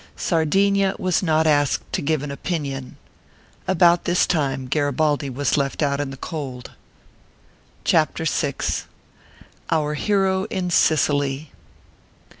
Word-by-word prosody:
Sardinia 195 +4 +2
was 185 +3 0
not 160 -3 +2
asked 145 -2 +2
to - - 0
give 150 0 0
an 145 - -5
opinion. 140 -4 -4 0.7
About 175 -1 +4
this 175 0 +3
time 135 -5 -1
Garibaldi 145 +1 0
was 135 +1 0
left 140 +2 -1
out 140 -1 0
in 145 -1 -2
the 135 - -8
cold. 135 -5 -6 1.1
CHAPTER - - +1
VI. - - 0 1.1
OUR 150 -2 +1
HERO 190 +3 +1
IN 185 -4 -3
SICILY. 145 -3 +2
150 Hz, 115 wpm, -22 LUFS, 140-175 Hz, 1.1 s, About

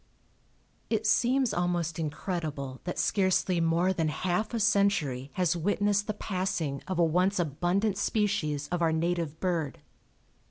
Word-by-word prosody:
It 220 -1 0
seems 250 +3 +3
almost 175 -2 -1
incredible 150 -3 -4
that 180 - -3
scarcely 185 -2 +2
more 170 +3 +2
than 165 -3 0
half 180 +7 -1
a 235 - -1
century 200 - +1
has 180 -2 +1
witnessed 205 +3 +1
the 215 - -2
passing 180 -9 -2
of 185 - -2
a 170 - +4
once 180 +5 +2
abundant 180 +6 0
species 170 -11 0
of 175 -1 -2
our 165 -1 +3
native 165 -1 -1
bird. 170 -6 -1
175 Hz, 135 wpm, -29 LUFS, 160-200 Hz, -, a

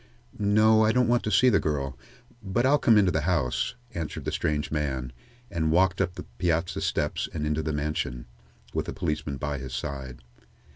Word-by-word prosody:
"No, 110 +2 +5
I 110 - +4
don't 125 0 +3
want 120 0 +3
to 105 - -1
see 125 +5 +5
the 100 - +4
girl. 70 -4 -2 0.5
But 105 +5 0
I'll 145 +2 +4
come 115 -4 +5
into 95 -3 +4
the 80 - 0
house," 70 -8 0 0.2
answered 80 -3 -5
the - - -1
strange 75 -1 -1
man, 65 -5 -2 0.4
and 80 -2 0
walked 95 +3 +3
up 90 -2 -1
the - - -6 0.2
piazza 85 -1 0
steps - - -1
and 75 -2 -3
into 75 +1 0
the 80 - -2
mansion, 75 -5 -2 0.5
with - - -2
the - - -4
policeman 75 -3 -2
by 75 0 -3
his 65 -1 -6
side. 65 -2 -5
80 Hz, 190 wpm, -27 LUFS, 70-100 Hz, 0.5 s, No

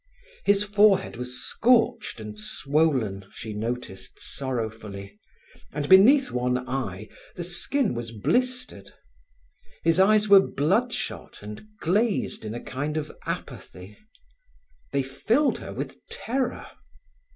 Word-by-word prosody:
His 200 0 +4
forehead 205 -4 +3
was 125 +1 -5
scorched 235 - +2
and 105 -1 -8
swollen, 135 -6 0
she 110 -1 -6
noticed 105 -3 -5
sorrowfully, 110 -6 -5 0.5
and 145 0 -3
beneath 250 - +7
one 125 +1 -1
eye 110 -6 -3 0.3
the 175 - -4
skin 200 - 0
was 120 -1 -4
blistered. 250 - -2 0.9
His 165 +2 +3
eyes 210 +2 +5
were 200 -1 +9
bloodshot 145 - -1
and 105 - -9
glazed 205 - 0
in 110 +1 -5
a - - -4
kind 145 +4 -3
of 155 -1 -3 0.2
apathy; 95 +3 -7 1.0
they 140 -1 +1
filled 220 - +1
her - - -7
with - - -6
terror. 270 - -2
140 Hz, 115 wpm, -26 LUFS, -, 1.0 s, were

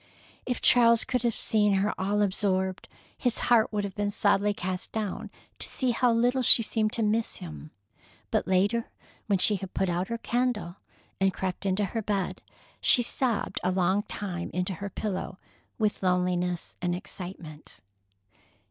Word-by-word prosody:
If 250 -2 -2
Charles 235 -2 +6
could 255 -2 -1
have 235 -2 0
seen 210 -2 +2
her 195 +2 +1
all 205 +2 +1
absorbed, 190 -1 0 0.3
his 245 -3 +1
heart 230 -2 +3
would 210 -1 -1
have 200 -1 -4
been 205 +1 -1
sadly 205 0 +2
cast 185 -2 -4
down 215 -3 -3 0.3
to - - +1
see 255 -2 -1
how 245 +1 +2
little 245 +3 +2
she 235 -1 +6
seemed 215 -1 0
to 230 - +1
miss 220 +2 0
him. 160 -4 -9 0.6
But - - 0
later, 200 +5 +1 0.4
when 200 -2 +3
she 200 +3 +2
had 190 0 -8
put 190 -1 +1
out 175 +2 -1
her 230 - -3
candle 235 -7 -1 0.4
and 195 0 +3
crept 190 +1 -3
into 195 +2 +1
her 225 +4 -3
bed, 200 -3 -2 0.4
she 245 - +5
sobbed 235 -2 0
a 180 - +2
long 185 +2 +2
time 185 -4 -5
into 180 +1 -1
her 200 +3 -5
pillow 190 -2 -4 0.4
with 215 -1 0
loneliness 180 -1 0
and 175 -1 0
excitement. 175 - -9
200 Hz, 165 wpm, -28 LUFS, 185-225 Hz, 0.6 s, Charles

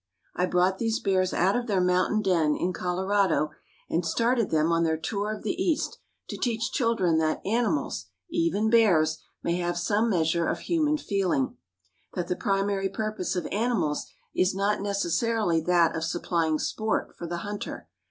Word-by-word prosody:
I 180 - +1
brought 180 +2 +2
these 225 -1 0
bears 185 -1 +1
out 190 +3 +2
of 245 0 -1
their 200 -4 +1
mountain 180 +4 +2
den 165 -6 +2
in 180 +1 -1
Colorado 185 -3 +1 0.4
and 170 - 0
started 230 +4 +1
them 160 +1 +2
on 165 0 +2
their 160 -1 +1
tour 205 +6 -2
of 215 - -6
the 215 - 0
East 325 -5 -1 0.3
to - - -5
teach 230 -2 -1
children 225 - +2
that 155 -1 +1
animals, 200 - 0 0.2
even 200 +7 +1
bears, 165 -9 +4 0.2
may 170 +1 0
have 175 -1 -1
some 210 +6 +1
measure 165 -3 +1
of - - -2
human 305 -3 +1
feeling; 195 - 0 0.6
that 175 -2 -2
the 180 - +1
primary 195 0 0
purpose 215 -2 -3
of 180 - -2
animals 205 -9 0 0.3
is 185 +1 +2
not 200 +1 +1
necessarily 200 -1 +1
that 170 0 +3
of 160 - -2
supplying 165 -2 0
sport 220 +7 -2
for 170 - -6
the 175 +1 -3
hunter. 205 0 -6
190 Hz, 165 wpm, -27 LUFS, 170-215 Hz, 0.6 s, bears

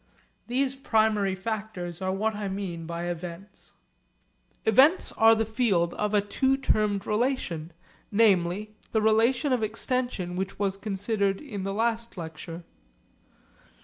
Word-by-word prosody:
These 260 +2 +1
primary 220 -7 +1
factors 190 -4 -5
are 185 0 0
what 215 +3 0
I 205 -1 -4
mean 185 -4 -4
by 170 0 -4
events. 175 +3 -7 0.9
Events 265 - +5
are 225 0 +6
the 225 0 0
field 205 -7 +1
of 210 0 -1
a 205 - +5
two 265 +6 +1
termed 210 -6 +1
relation, 210 - -1 0.4
namely 200 -1 +2 0.2
the 220 - +3
relation 235 +6 +3
of 250 - +1
extension 220 -4 -2
which 190 +1 -3
was 195 -1 0
considered 200 0 -1
in 205 -10 -6
the 195 - -2
last 230 0 -1
lecture. 165 +1 -7
210 Hz, 130 wpm, -27 LUFS, 185-225 Hz, 0.9 s, are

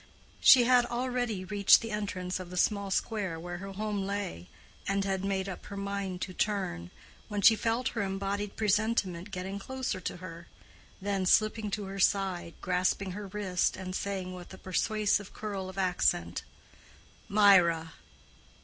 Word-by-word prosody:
She 255 -2 +8
had 245 0 +4
already 245 -5 -2
reached 200 +1 +5
the 225 -1 -5
entrance 190 -3 -3
of 185 -1 -8
the 180 - -7
small 200 +1 +1
square 195 -4 -1
where 175 +1 -6
her 195 +1 -7
home 210 0 -2
lay, 200 - -4 0.4
and 195 0 +1
had 190 -1 -1
made 195 -1 -1
up 190 - -7
her 200 - -7
mind 200 -2 -3
to 185 - -4
turn, 180 - -2 0.4
when 205 -2 -3
she 225 - +8
felt 230 +3 0
her 230 - -3
embodied 200 +1 -2
presentiment 210 -3 0
getting 190 +1 -5
closer 255 -3 -4
to 175 - -4
her, 170 -1 -9 0.5
then 195 -1 -1
slipping 215 +1 +3
to 205 +1 -3
her 195 +1 -6
side, 190 -3 +1
grasping 185 +1 0
her 205 +2 -6
wrist, 190 -2 0
and 185 0 -5
saying, 190 -2 -3
with 180 -1 -10
a 190 - -9
persuasive 205 +2 0
curl 200 -3 -4
of 190 - -11
accent, 175 - +1 0.9
"Mirah!" 180 -6 +5
195 Hz, 160 wpm, -30 LUFS, 185-210 Hz, 0.9 s, She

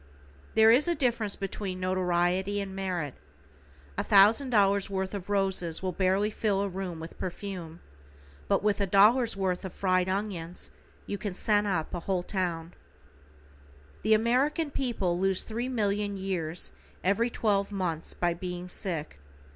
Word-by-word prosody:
There 220 0 +7
is 265 +8 +5
a 345 - +2
difference 235 -7 0
between 195 -1 -4
notoriety 185 +1 +1
and 195 -1 -5
merit. 180 -7 -2 0.9
A - - +1
thousand 215 +7 +5
dollars 200 -3 +3
worth 190 0 -2
of 200 -1 -6
roses 190 -4 0
will 185 - 0
barely 190 +4 +1
fill 205 -2 0
a 200 - 0
room 185 -3 -5
with 165 +1 -9
perfume, 180 -3 -6 0.7
but - - +2
with 210 -1 +1
a 200 - +1
dollar's 215 +4 +4
worth 185 -2 -1
of 190 - -6
fried 185 -1 +1
onions 185 -3 -4 0.3
you 200 - -4
can 200 -4 -4
scent 210 0 +2
up 165 -5 -1
a 175 - -2
whole 180 +1 -1
town. 175 -3 -2 1.3
The 220 - +4
American 275 +8 +1
people 205 -11 -1
lose 190 0 +1
three 235 +3 -3
million 205 -4 0
years 180 -4 -2 0.3
every 200 +6 +2
twelve 205 -4 0
months 175 -5 -3
by 175 -1 +1
being 180 +1 -6
sick. 165 - -4
195 Hz, 150 wpm, -28 LUFS, 180-210 Hz, 1.3 s, There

